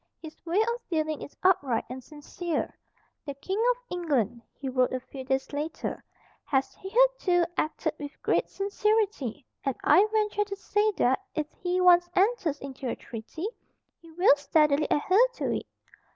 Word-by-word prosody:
His 315 -1 -11
way 345 +5 +2
of 470 +2 -1
dealing 310 -3 -1
is - - -10
upright 285 -11 +3
and 255 +1 -7
sincere." 310 +4 -4 0.5
"The 280 -2 -6
King 385 +10 -2
of - - +2
England," 275 - 0
he 275 - -8
wrote 255 -1 +2
a 255 - -1
few 265 +1 -9
days 265 +2 -1
later, 300 +3 -4 0.4
"has 270 -1 0
hitherto 395 -4 +2
acted 310 - -1
with 290 0 -8
great - - +1
sincerity; 400 - 0 0.2
and 270 -3 -1
I 405 +3 +6
venture 420 -1 +1
to 400 -1 -5
say 415 +2 +1
that, 260 -7 +2 0.2
if 305 - 0 0.2
he 360 0 0
once 350 -1 +6
enters 375 -7 +2
into 265 -2 -5
a - - -2
treaty, 245 - -6 0.5
he 330 -1 -16
will 350 -3 +6
steadily 300 0 +3
adhere 385 +11 +4
to - - -1
it." - - -5
325 Hz, 160 wpm, -28 LUFS, 275-395 Hz, 0.5 s, I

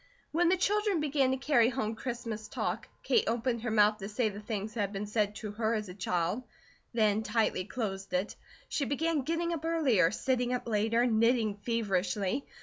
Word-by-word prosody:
When 340 +2 +3
the 375 - +3
children 410 0 +1
began 285 -3 +2
to 265 - +1
carry 255 -4 +3
home 230 -4 -2
Christmas 225 -2 -5
talk, - - -3 0.2
Kate 450 - +3
opened 235 0 0
her 240 - -2
mouth 210 0 +4
to 195 0 -5
say 220 +1 +1
the 205 0 -7
things 215 0 -4
that 225 - -5
had 200 -1 -1
been 200 +1 -3
said 210 -1 0
to 215 -1 -5
her 220 +2 0
as 215 -3 -3
a - - -7
child; 180 +2 -1 0.5
then 215 -2 +2
tightly 220 -5 0
closed 195 -2 -4
it. 185 +3 -1 0.3
She 280 - -1
began 305 +3 0
getting 335 +4 -1
up 320 -2 -4
earlier, 295 - +3
sitting 250 +4 0
up 245 - -5
later, 225 +2 +2
knitting 230 -1 +3
feverishly. 205 +1 -1
225 Hz, 190 wpm, -31 LUFS, 210-265 Hz, 0.5 s, mouth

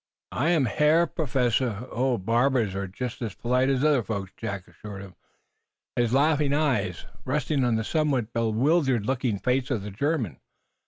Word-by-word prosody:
'" - - -66
"I 145 +8 0
am 160 -6 +3
Herr 155 +5 +3
Professor 125 - 0
" - - -19
"Oh, 125 +1 +1
barbers 115 +1 +1
are 100 0 -3
just 120 +7 -6
as 110 -4 -4
polite 125 +2 +1
as 135 0 +1
other 150 -4 +4
folks," 100 -4 -4
Jack 100 -5 -5
assured 100 -2 -9
him, 95 -2 -12 0.8
his 120 -2 +1
laughing 145 +1 +3
eyes 120 - 0 0.2
resting 145 +1 0
on 120 -2 +2
the 110 - 0
somewhat 135 -5 0
bewildered 120 +2 +2
looking 125 -4 0
face 125 +5 0
of 115 -7 -1
the 105 - -6
German. 115 - -1
125 Hz, 170 wpm, -26 LUFS, 110-140 Hz, 0.8 s, other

